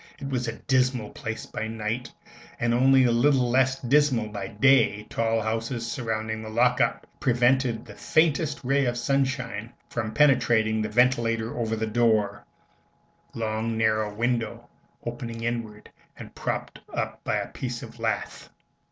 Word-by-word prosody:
It 135 - -5
was 125 -2 -1
a 115 - -2
dismal 130 -5 0
place 110 0 -5
by 110 - -4
night, 115 +2 -4 0.5
and 120 0 +1
only 130 +1 +5
little 125 +2 +3
less 130 +1 +2
dismal 130 -4 +2
by 100 -2 -5
day, 105 -2 +3
tall 115 0 +1
houses 115 +2 -2
surrounding 110 -2 -3
"the 110 - -7
lock 125 +3 +3
up" - - 0
prevented 125 -1 +2
the - - -11
faintest 155 -2 +1
ray 135 +2 +2
of 120 -1 -1
sunshine 125 -4 -1 0.2
from 110 -2 -2
penetrating 115 -6 +3
the 110 - -2
ventilator 115 -1 +2
over 115 -2 -1
the 110 0 -2
door 110 -3 +1 0.9
long 110 0 -2
narrow 110 -1 +1
window 115 +2 -2 0.4
opening 120 -1 -5
inward 115 -3 -4 0.3
and - - -10
propped - - -4
up - - -4
by - - 0
a - - -2
piece 120 -2 -5
of 115 0 -11
lath. 115 -1 -3
115 Hz, 145 wpm, -26 LUFS, 110-125 Hz, 0.9 s, only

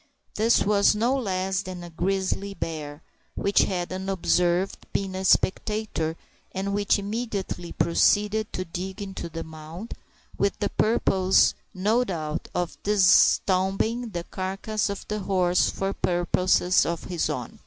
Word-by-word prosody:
This 225 +2 +3
was 200 0 +4
no 235 +5 +2
less 190 -5 -1
than 185 -2 -7
a 175 - -9
grizzly 195 +3 -1
bear, 155 -3 -5 0.3
which 200 0 +2
had, 180 -1 -3
unobserved, 185 -1 0
been 195 -1 -1
a 190 0 -4
spectator, 190 -4 +1 0.4
and 195 +1 -2
which 205 -1 +2
immediately 200 -4 -4
proceeded 210 +5 +2
to 185 - -3
dig 185 +3 -6
into 195 -4 -6
the 165 0 -5
mound, 160 +7 -9 0.5
with 200 - +1
the 210 - -1
purpose, 190 -4 +3 0.2
no 215 +6 +2
doubt, 155 -7 -4
of 175 -1 -3
disentombing 200 +3 +3
the 170 -1 -3
carcass 195 +4 -3
of 200 - -6
the 210 0 -2
horse 185 -3 +2
for 195 0 -2
purposes 180 +1 +2
of 170 -1 -3
his 175 -3 -2
own. 130 -6 -5
190 Hz, 135 wpm, -25 LUFS, 175-205 Hz, 0.5 s, was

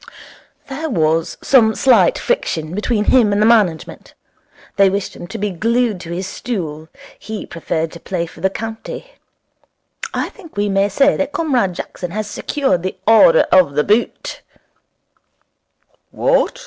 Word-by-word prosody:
'There 305 +4 -4
was 160 - 0
some 225 -5 +4
slight 270 - +4
friction 160 - -2
between 210 +2 0
him 230 -3 +4
and 200 - +1
the 210 - +4
management. 210 -8 +1 0.6
They 195 -1 +5
wished 195 0 -3
him 175 - -9
to 190 - -7
be 205 0 -2
glued 230 +2 0
to 170 - -9
his 180 +2 -3
stool; 160 -8 -5 0.3
he 220 -1 -6
preferred 165 -1 -3
to 170 - -11
play 175 -2 -3
for 165 - -14
the 190 - +2
county. 225 - -7 1.0
I - - -2
think 335 - -16
we 205 0 0
may 195 +1 +2
say 275 +8 +3
that 285 0 -2
Comrade 255 - 0
Jackson 180 0 -6
has 215 +4 -3
secured 265 -3 -1
the 185 +1 -4
Order - - +6
of 175 -7 +4
the 150 - +2
Boot.' 215 +6 -1 1.7
'What? - - +1
205 Hz, 150 wpm, -18 LUFS, 180-245 Hz, 1.7 s, Order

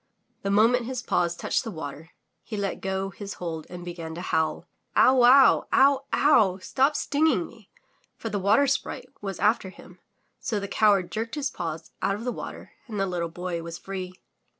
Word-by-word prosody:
The 195 - -2
moment 230 +4 +3
his 255 -2 -4
paws 175 -5 +1
touched - - -1
the 230 - -5
water, 160 -3 -7 0.3
he 215 - -6
let 200 -1 -3
go 190 0 -2
his 200 0 -7
hold 165 -3 -5
and 175 0 -8
began 165 -2 -6
to 175 - -6
howl. 160 -3 -1 0.3
"Ow 255 - +6
wow! 255 +2 +6
Ow! 275 0 +4
Ow! 220 -11 +4
Stop 270 +9 +1
stinging 290 - +1
me! 225 -4 -16 0.5
For 225 - -5
the 205 - -2
Water 205 +9 +4
Sprite 275 +1 -2
was 195 -2 -4
after 210 -2 +2
him, - - -15 0.4
so 215 -4 -2
the 200 - -5
coward 200 -3 +3
jerked 225 +3 -3
his 285 -2 -2
paws 160 -2 -5
out 195 - +1
of 210 - -7
the 250 - -1
water - - -8 0.2
and 215 -4 -5
the 195 - +2
little 175 -3 -2
Boy 175 0 -4
was 165 0 -7
free. 185 -1 -6
195 Hz, 190 wpm, -26 LUFS, 175-235 Hz, 0.5 s, Ow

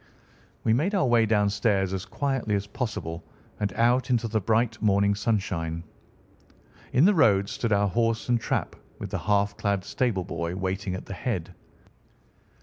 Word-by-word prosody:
We 110 - +3
made 165 - +1
our 165 - +3
way 120 -3 +4
downstairs 105 -2 +1
as 95 -1 -3
quietly 135 -7 -1
as 100 0 -1
possible, 100 -7 -4 0.4
and 105 -1 -1
out 120 +3 +2
into 120 -2 +1
the 110 0 0
bright 110 +2 +1
morning 100 -1 +3
sunshine. 90 -7 -2 1.1
In 135 +6 +4
the 205 - +6
road 100 - +4
stood 115 - -2
our 100 0 +3
horse 115 +3 0
and 120 -2 +2
trap, - - -2 0.2
with - - -7
the - - -2
half 100 -1 +1
clad 100 -2 0
stable 115 -8 0
boy 85 -1 -4
waiting 95 0 -2
at 95 - -7
the - - -7
head. 90 -4 -3
105 Hz, 160 wpm, -26 LUFS, 95-115 Hz, 1.1 s, the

